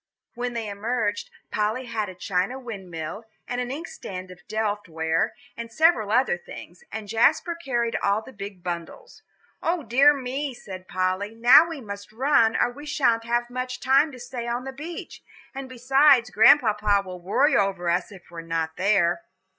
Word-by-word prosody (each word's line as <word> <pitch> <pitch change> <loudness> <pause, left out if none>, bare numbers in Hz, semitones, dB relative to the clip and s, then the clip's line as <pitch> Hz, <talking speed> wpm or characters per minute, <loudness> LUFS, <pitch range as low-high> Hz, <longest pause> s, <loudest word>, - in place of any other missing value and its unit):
When 245 0 -3
they 230 -2 -3
emerged, 210 +1 -2 0.2
Polly 215 +5 -1
had 215 -4 -3
a 185 - -10
china 185 +6 -1
windmill, 195 -5 -7 0.2
and 245 0 -2
an 245 - -4
inkstand 190 - -7
of 180 -1 -14
Delft 210 -3 -2
ware, 160 0 0 0.2
and 230 0 -7
several 245 -9 +3
other 240 -6 +2
things, 175 0 -12
and 220 -1 -6
Jasper 260 - +2
carried 240 -8 -2
all 200 +2 0
the 260 - -12
big 200 -3 -8
bundles. 175 - -7 0.4
"O 335 -1 -1
dear 275 +4 +5
me," 270 0 -3
said 185 -4 -10
Polly, 185 +3 -1
"now 245 +8 +7
we 320 -5 -6
must 200 -2 -8
run, 230 -2 +3
or - - +2
we 290 +4 -11
sha'n't 235 -6 +1
have 240 +1 -1
much 255 0 -4
time 275 +4 +3
to 255 - -11
stay 245 -1 -6
on 240 +1 -2
the 270 0 -6
beach; 320 +5 -8 0.3
and 270 -1 -7
besides, 255 0 +4
Grandpapa 210 -3 +5
will 180 -1 -8
worry 265 - +2
over 195 -3 +1
us 175 +3 0
if 185 -3 -15
we're 170 -1 -7
not 165 -1 -3
there." 195 - +2
225 Hz, 170 wpm, -25 LUFS, 195-260 Hz, 0.4 s, now